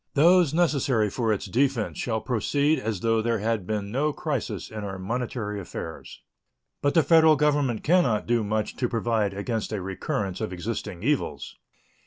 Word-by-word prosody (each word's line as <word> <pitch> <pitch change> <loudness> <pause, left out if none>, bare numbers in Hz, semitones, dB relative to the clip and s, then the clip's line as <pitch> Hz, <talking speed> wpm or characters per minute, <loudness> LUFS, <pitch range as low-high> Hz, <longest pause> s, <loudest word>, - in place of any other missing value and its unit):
Those 170 +1 +5
necessary 140 - +2
for 115 -3 0
its 105 - -1
defense 120 +2 0
shall 110 -2 -1
proceed 140 +6 +1
as 105 -4 -3
though 115 -1 +2
there 115 0 0
had 110 -3 -1
been 105 -2 -2
no 145 +5 +1
crisis 145 -5 -4
in 110 -1 -6
our 95 -1 -5
monetary 110 +1 -3
affairs. 90 - -8 0.6
But 145 - +1
the 165 - +6
Federal 160 +1 +6
Government 145 -5 +1
can 180 +4 +5
not 115 -9 0
do 120 -1 +1
much 105 +1 -2
to 125 - 0
provide 110 -4 0
against 110 +2 -3
a 105 - -2
recurrence 95 +1 -3
of 110 - -2
existing 90 -1 -5
evils. 145 +3 -1
115 Hz, 170 wpm, -26 LUFS, 105-140 Hz, 0.6 s, the